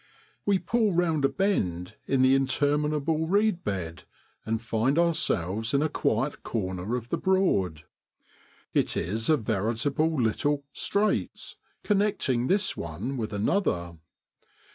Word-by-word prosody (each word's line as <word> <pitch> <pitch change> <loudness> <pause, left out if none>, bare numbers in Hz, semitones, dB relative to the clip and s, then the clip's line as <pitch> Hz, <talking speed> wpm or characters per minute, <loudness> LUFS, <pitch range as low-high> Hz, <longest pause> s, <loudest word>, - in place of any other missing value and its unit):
We 200 -1 +4
pull 220 0 +1
round 165 -4 +2
a - - +3
bend 90 - -1
in 135 -1 +2
the 130 +1 +5
interminable 150 +3 +1
reed 200 0 +2
bed, 90 -4 -4 0.4
and 110 0 0
find 115 +5 0
ourselves 115 - +1
in 140 - +3
a 155 - +1
quiet 130 +4 -1
corner 95 0 -3
of 120 -1 -5
the - - -1
Broad. 100 - +1 0.9
It - - +1
is 110 - -1
a 155 - +5
veritable 120 +8 0
little 140 +5 0
' - - -53
straits,' 210 +1 -1 0.3
connecting 200 - +1
this 195 0 +1
one 90 - -5
with 110 -4 -3
another. 100 - -1
135 Hz, 130 wpm, -27 LUFS, 105-165 Hz, 0.9 s, the